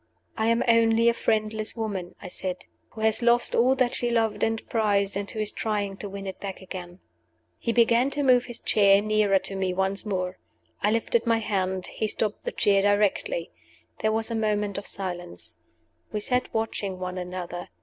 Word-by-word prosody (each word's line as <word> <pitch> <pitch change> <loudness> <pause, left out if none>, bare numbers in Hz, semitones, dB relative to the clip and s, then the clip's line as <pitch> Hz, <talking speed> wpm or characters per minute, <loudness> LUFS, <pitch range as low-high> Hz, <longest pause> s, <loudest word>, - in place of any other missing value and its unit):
"I 220 - 0
am 230 +1 +3
only 230 0 +5
a - - +3
friendless 215 -1 -1
woman," 200 -6 -4
I - - -8
said, 180 0 -4 0.2
"who 220 - -9
has 220 +1 +2
lost 240 0 +4
all 255 +3 +4
that 255 -2 +1
she 240 - 0
loved 225 -2 +1
and 225 0 -1
prized, 205 -3 +1
and 200 0 -3
who 220 - -3
is 215 -1 0
trying 205 -3 -2
to 205 - -6
win 195 0 -7
it 190 - -6
back 195 -2 -6
again." 185 -1 -8 0.6
He 235 - -1
began 235 +2 +4
to 290 +1 -2
move 250 -2 +5
his 240 -2 -6
chair 200 -2 +5
nearer 210 -1 +3
to 195 +1 -2
me 190 -1 -1
once 190 +1 0
more. 185 -3 -3 0.4
I 205 - +3
lifted 230 +1 +1
my 230 -1 +4
hand. 190 -4 -1
He 220 - -3
stopped 210 0 -2
the - - -1
chair 200 -1 +3
directly. 205 - +1 0.5
There 220 - +1
was 225 +1 -1
a - - -1
moment 210 -2 0
of 200 - -10
silence. 175 - -6 0.5
We 210 - -1
sat 250 +4 -1
watching 210 -4 -2
one 185 0 -4
another. 180 -1 -6
210 Hz, 190 wpm, -26 LUFS, 195-225 Hz, 0.6 s, only